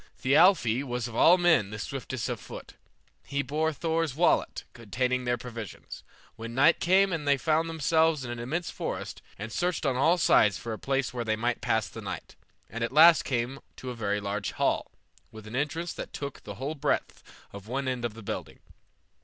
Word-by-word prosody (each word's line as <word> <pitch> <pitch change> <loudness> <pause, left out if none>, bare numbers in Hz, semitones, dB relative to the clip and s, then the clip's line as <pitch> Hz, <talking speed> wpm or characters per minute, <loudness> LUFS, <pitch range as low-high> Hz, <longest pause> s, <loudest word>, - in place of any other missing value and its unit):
Thialfi 135 - +4
was 125 -3 -3
of 120 - -9
all 175 +9 +6
men 170 - +3
the 105 - -6
swiftest 130 0 -4
of - - -3
foot. - - -10 0.5
He 140 0 -2
bore 155 +4 0
Thor's 160 -2 -1
wallet, 170 +3 +1
containing 125 +3 -2
their 120 0 +1
provisions. 115 -4 -9 0.3
When 115 +1 -7
night 145 +6 +5
came 190 +2 +3
on 155 -3 -3
they 140 -1 +3
found 160 +4 +1
themselves 160 -2 +2
in 120 - -5
an 120 - -5
immense 160 +9 -3
forest, - - -5 0.2
and 105 +3 -6
searched 175 +1 -1
on 130 -2 +1
all 165 +7 +4
sides 105 - +4
for 115 -1 -5
a 110 - -7
place 135 -1 -1
where 120 -1 -3
they 110 -1 0
might 120 +2 -1
pass 110 -1 +1
the - - -9
night, - - -7 0.3
and 115 +1 -5
at 115 - -1
last 160 +4 +7
came 125 +1 -2 0.2
to 130 - -6
a - - -7
very 105 -2 -1
large 100 -1 -3
hall, - - 0 0.4
with 110 -1 -11
an 110 +3 -7
entrance 160 +5 -2
that - - -8
took 140 -1 -6
the 100 - -7
whole 135 +6 -4
breadth 145 - -2 0.3
of 100 0 -10
one 135 +3 -2
end 125 -2 -2
of 115 -2 -3
the 115 - -10
building. - - -5
130 Hz, 200 wpm, -28 LUFS, 115-160 Hz, 0.5 s, last